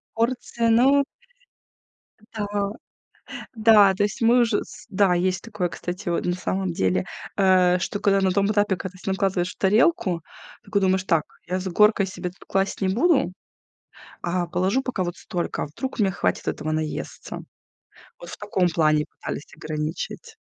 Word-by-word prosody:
Порции, 230 0 0
ну 270 +5 +5 1.3
Да, 205 -1 -2 0.9
да, 215 -3 +6
то 205 - +1
есть 210 - -3
мы 240 +2 +5
уже 230 -3 +2
с - - -13
да, 190 -2 +3
есть 180 0 0
такое, 210 -6 -2
кстати, 180 +3 -6
вот 170 - 0
на 175 - 0
самом 185 0 -2
деле, 90 - +1 0.3
э, 185 -2 +4
что 205 +3 -3
когда 195 -1 +3
на 190 -1 +2
том 200 +1 +2
этапе, 205 -2 +2
когда 185 +1 -7
ты 195 - -2
накладываешь 190 -2 0
в - - -42
тарелку, 200 - +2 0.4
такой 200 0 0
думаешь: 190 -1 +2
"Так, 165 -5 +2 0.2
я 185 +1 0
с 190 - -6
горкой 210 +2 +4
себе 180 -1 -5
тут 180 - -18
класть 195 +1 -1
не 190 - +1
буду, 265 - +3 0.9
а 175 0 -1
положу 185 +9 +1
пока 255 -8 -2
вот 175 0 -4
столько, 175 -5 -3
вдруг 245 - -6
мне 195 -2 +3
хватит - - -1
этого 155 +1 -2
наесться". 155 -1 -4 0.8
Вот 175 - -11
в - - -7
таком 195 -3 +1
плане 155 -3 +2
пытались - - -7
ограничить. 155 - -5
190 Hz, 160 wpm, -24 LUFS, 175-210 Hz, 1.3 s, да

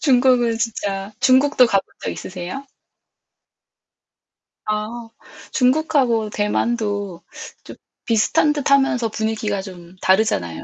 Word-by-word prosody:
중국은 250 -4 +3
진짜. 205 -3 -3
중국도 260 0 +5
가본 195 -4 +1 0.2
적 - - -2
있으세요? 185 +9 -7 2.0
아 220 +2 -4 0.4
중국하고 255 -5 +2
대만도 205 -3 -1 0.4
좀 - - -11 0.3
비슷한 230 +6 +2
듯하면서 270 -5 +2
분위기가 215 -2 -2
좀 180 -2 -12
다르잖아요. 140 - +1
225 Hz, 230 characters per minute, -20 LUFS, 200-255 Hz, 2.0 s, 중국도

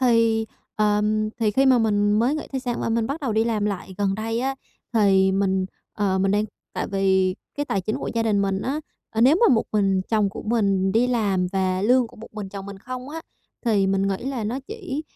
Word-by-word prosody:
Thì, 230 -3 +3 0.3
ờm, 215 0 +1
thì 220 -3 +2
khi 265 +6 +3
mà 255 -2 +6
mình 205 -2 +2
mới 235 +7 +2
nghỉ 310 - -4
thai 265 - -1
sản 245 -2 -2
và - - -1
mình 225 0 +1
bắt 285 +4 -4
đầu 265 -6 -1
đi 220 +1 +2
làm 220 -3 0
lại 195 -2 -3
gần 195 -1 +1
đây 225 +3 -2
á, 270 +1 -1 0.4
thì 195 -3 +4
mình, 190 -1 +1 0.3
ờ, 195 -2 0
mình 195 0 +2
đang 210 +1 +2 0.3
tại - - -2
vì 190 -2 +2 0.2
cái 290 - -2
tài 195 - 0
chính 215 +4 -2
của - - -4
gia 230 - +1
đình 205 -3 +2
mình 195 0 0
á, 285 +4 -2 0.3
ờ, 225 - -2
nếu 270 +8 +6
mà 425 - +5
một 225 - +2
mình 195 -3 +2
chồng 215 -3 +2
của - - -7
mình 195 -4 +1
đi 235 +3 +3
làm 200 -7 +1
và 185 -1 0
lương 245 +3 +4
của - - -17
một 220 - -11
mình 210 -2 -6
chồng 195 0 -7
mình 200 -1 -8
không 255 +4 -7
á, 325 - -5 0.4
thì 205 -4 +3
mình 195 0 +1
nghĩ 195 - 0
là 265 -5 -3
nó 235 +6 -2
chỉ, 365 - -5
215 Hz, 240 wpm, -23 LUFS, 195-240 Hz, 0.4 s, mà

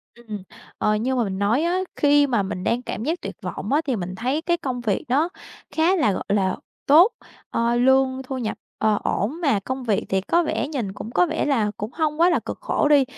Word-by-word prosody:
Ừm. 215 -4 -8 0.3
Ờ, 215 - +2
như 250 +5 0
mà 245 - +2
mình 190 -2 -3
nói 220 +9 +2
á, 350 +2 +1 0.2
khi 290 0 +4
mà 235 -6 +1
mình 185 -1 -4
đang 235 +4 +1
cảm 225 - -5
giác 330 +6 -2
tuyệt - - -6
vọng - - -4
á, 300 - +4
thì 265 -4 0
mình 185 -2 -4
thấy 255 +9 -1
cái 345 +1 +1
công 260 -7 -4
việc 210 -5 -1
đó 290 +7 +2 0.4
khá 330 +4 +3
là, 290 - +3
gọi - - -3
là, 195 -2 +2 0.3
tốt. 335 +10 +7 0.4
Ờ, 235 +1 +1
lương 265 +1 +3
thu 265 0 -5
nhập, 230 -4 -3 0.2
ờ, 215 -1 +2
ổn 275 - -1
mà 280 -11 +2
công 260 +6 -5
việc 215 -5 0
thì 190 0 +1
có 340 - +2
vẻ 310 - -1
nhìn 245 -10 -3
cũng 215 +3 -7
có 360 - +4
vẻ 320 -1 -1
là 230 -8 +1
cũng 210 +3 -5
hông 310 -1 -1
quá 345 - +6
là 345 - +2
cực - - -6
khổ - - +1
đi. 290 -2 +6
255 Hz, 235 wpm, -23 LUFS, 215-300 Hz, 0.4 s, tốt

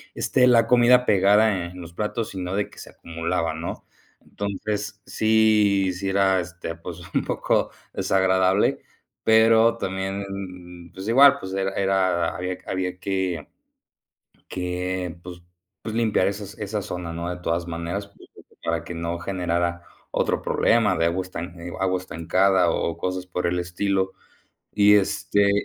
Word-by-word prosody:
esté 125 -1 +3
la 115 -2 +5
comida 125 0 +5
pegada 100 -1 +3
en 90 - -11
los 85 -1 -10
platos, 110 +3 -3
sino 95 0 -4
de 105 - -1
que - - -19
se - - -10
acumulaba, 85 0 -3
¿no?, 80 +2 -6 0.3
entonces, 100 0 -4
sí, 105 -3 +3
sí 95 +2 -3
era, 95 -1 +3
este, 85 -1 -7
pues, 85 0 -8
un - - +1
poco - - 0 0.2
desagradable, 95 0 +2 0.4
pero 115 +1 +5
también, 95 -3 -5
pues 95 +3 -8
igual, 140 +4 +7
pues 95 0 -7
era 95 0 -1
era, 95 -3 +1
había 90 0 -3
había 90 -1 -3
que 95 -5 -2 1.0
que, 90 -1 -3
pues 90 -1 -9 0.4
pues 110 0 -5
limpiar 110 -5 +2
esas 100 0 -5
esa 105 0 -3
zona, 90 -2 -5
¿no?, 85 +1 -4
de 90 - -10
todas 85 0 -1
maneras, 85 +5 -4 0.5
para 80 -1 -1
que 85 - -7
no 85 +1 -3
generara 85 -2 -2 0.3
otro - - 0
problema 115 -6 +2
de 85 - +2
agua 85 +3 0
estan 90 -1 -7 0.2
agua 95 -1 +1
estancada 90 +1 +2
o 85 - -2
cosas 90 0 -3
por 90 0 -3
el 90 +1 0
estilo, 95 +2 -1 0.6
y 105 0 +6
este, 100 0 +2
95 Hz, 145 wpm, -24 LUFS, 90-100 Hz, 1.0 s, igual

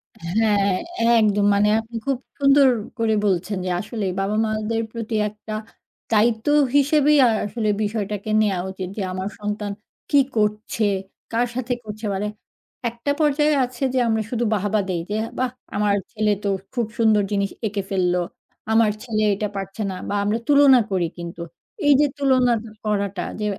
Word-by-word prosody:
হ্যাঁ। 200 +3 +1 0.5
একদম। 210 -2 +3
মানে 210 +1 +3
আপনি 225 +1 -9
খুব 270 -2 0 0.2
সুন্দর 275 -1 +6 0.3
করে 225 -1 +2
বলছেন 195 +1 0
যে, - - -1
আসলে 215 -1 -4
বাবা-মাদের 215 +2 0
প্রতি 230 -1 -4
একটা 215 +1 -9 0.6
দায়িত্ব 220 +1 +2 0.3
হিসেবেই 295 +1 +4
আ - - +5 0.2
আসলে 215 +1 -2
বিষয়টাকে 210 -1 -3
নেয়া 195 -4 +1
উচিত। 190 -1 -6
যে, - - -2
আমার 185 +1 -3
সন্তান 210 0 -3 0.4
কী 285 - +5 0.2
করছে, 210 +1 0 0.5
কার 240 +2 +1
সাথে 250 -1 -1
করছে। 215 0 -7
মানে 205 +2 -2 0.6
একটা 235 +5 -3
পর্যায়ে 295 0 +3
আছে 250 +1 -7
যে, 255 - +2
আমরা 220 -1 +1
শুধু 240 -1 -1
বাহবা 205 +1 +1
দেই। 175 -2 -1
যে, 210 - -1 0.2
বাহ! 255 -1 0 0.2
আমার 205 -1 +2 0.2
ছেলে 215 -2 +1
তো 200 - 0 0.2
খু 250 - -4
খুব 215 - -4
সুন্দর 215 -3 +4
জিনিস 200 -1 0 0.2
এঁকে 205 -1 -2
ফেললো। 180 -2 +1 0.5
আমার 220 -1 +4
ছেলে 215 -3 -1
এটা 210 +1 -2
পারছে 195 +3 -5
না - - -5
বা, 205 - -1
আমরা 210 +3 +1
তুলনা 280 -3 +7
করি 180 -3 +1
কিন্তু। 170 0 -7 0.5
এইযে 290 +1 +6
তুলনা 260 -3 +3 0.3
করাটা 200 -3 -1 0.2
যে, 210 - -2
215 Hz, 160 wpm, -22 LUFS, 200-240 Hz, 0.6 s, তুলনা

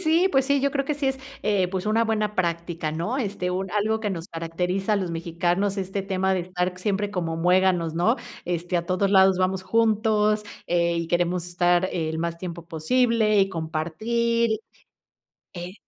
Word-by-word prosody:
Sí, 330 +4 +4
pues 270 -3 +2
sí, 280 0 +2
yo 280 +1 +1
creo 275 -1 0
que 300 - -1
sí 285 -1 -2
es, 265 0 0 0.2
eh, 200 -3 +2
pues 190 +1 -3
una 220 +2 +3
buena 215 -1 0
práctica, 170 -3 -2
¿no? 170 - -2
Este, 200 -6 -2
un 190 +1 -3
algo 215 +2 0
que 210 -2 -1
nos 170 -3 -5
caracteriza 180 +5 -1
a - - +2
los 185 -3 -2
mexicanos, 175 +4 -1
este 195 0 -3
tema 190 -1 0
de 185 - 0
estar 180 +1 -2
siempre 205 +1 -1
como 165 -4 -2
muéganos, 180 -1 +2
¿no? 180 +9 +2 0.3
Este, 175 +1 -2
a 170 - -1
todos 185 +2 +1
lados 190 -1 +5
vamos 185 0 0
juntos, 215 0 +2 0.2
eh, 170 -1 +1
y 170 0 -2
queremos 175 +1 0
estar 175 +1 +2
el 160 -2 -2
más 170 0 -2
tiempo 170 -2 -7
posible 220 +6 +2
y 195 -1 +4
compartir 220 +8 0 1.0
E 175 +1 -7
185 Hz, 180 wpm, -25 LUFS, 170-215 Hz, 1.0 s, lados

